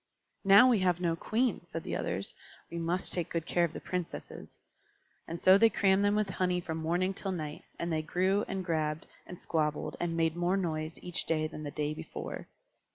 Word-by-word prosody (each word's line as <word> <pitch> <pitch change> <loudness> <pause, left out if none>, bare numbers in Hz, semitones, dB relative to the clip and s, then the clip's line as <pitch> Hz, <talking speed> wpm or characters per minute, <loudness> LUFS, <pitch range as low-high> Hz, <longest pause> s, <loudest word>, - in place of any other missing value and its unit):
"Now 200 +6 +8
we 240 -5 +4
have 180 -2 +2
no 170 -2 +1
Queen," 235 +8 0
said - - -5
the - - -3
others, - - -3 0.4
"we 170 - -4
must 170 +2 +2
take 175 -3 -1
good 165 -1 -2
care 175 0 +2
of 170 - +1
the - - -7
Princesses." 180 -1 -6 0.7
And 165 +1 -5
so 190 +3 +7
they 225 +1 +7
crammed 195 -2 +3
them 205 0 +3
with 210 -2 0
honey 180 -1 0
from 165 -2 -4
morning 175 +4 0
till 195 +1 -4
night; 155 -4 -5
and 170 0 -2
they 155 - +1
grew, 185 +5 +1
and 190 -1 -3
grabbed, 155 -2 -1 0.2
and 180 - -9
squabbled, 150 -2 -1
and 170 -1 -1
made 165 -1 +1
more 175 +2 +1
noise 160 -3 -2
each 175 -1 -2
day 155 -1 +1
than 155 0 -6
the 150 - -4
day 150 +1 -2
before. - - -7
175 Hz, 205 wpm, -31 LUFS, 160-190 Hz, 0.7 s, Now